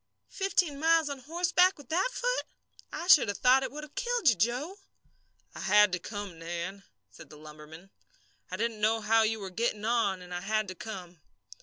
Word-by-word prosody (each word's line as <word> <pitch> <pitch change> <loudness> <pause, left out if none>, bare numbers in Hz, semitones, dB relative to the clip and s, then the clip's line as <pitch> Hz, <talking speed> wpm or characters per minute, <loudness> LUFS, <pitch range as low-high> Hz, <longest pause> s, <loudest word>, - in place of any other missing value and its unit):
"Fifteen 360 -7 0
miles 325 -1 +3
on 280 - -6
horseback 355 +6 +2
with 285 -4 -15
that 365 +9 +1
foot? - - -1 0.5
I - - -5
should 315 -9 +7
have 205 - -3
thought 255 +2 +4
it - - -4
would 300 +2 -8
have 300 - -12
killed 485 - +1
you, 230 - +3
Joe." 250 - -2 0.7
"I - - -10
had 210 0 +4
to 180 - -2
come, 200 -3 -7
Nan," 170 +4 -5 0.3
said - - -14
the 150 - -13
lumberman. 155 +4 -13 0.6
"I - - -5
didn't 230 -2 -2
know 220 +1 +2
how 225 +1 +3
you 220 0 0
were 195 -2 -7
getting 215 +1 -2
on, 220 -6 0
and 180 0 -10
I 175 - -4
had 215 +2 -1
to - - -5
come." 180 -4 -9
225 Hz, 195 wpm, -29 LUFS, 190-300 Hz, 0.7 s, should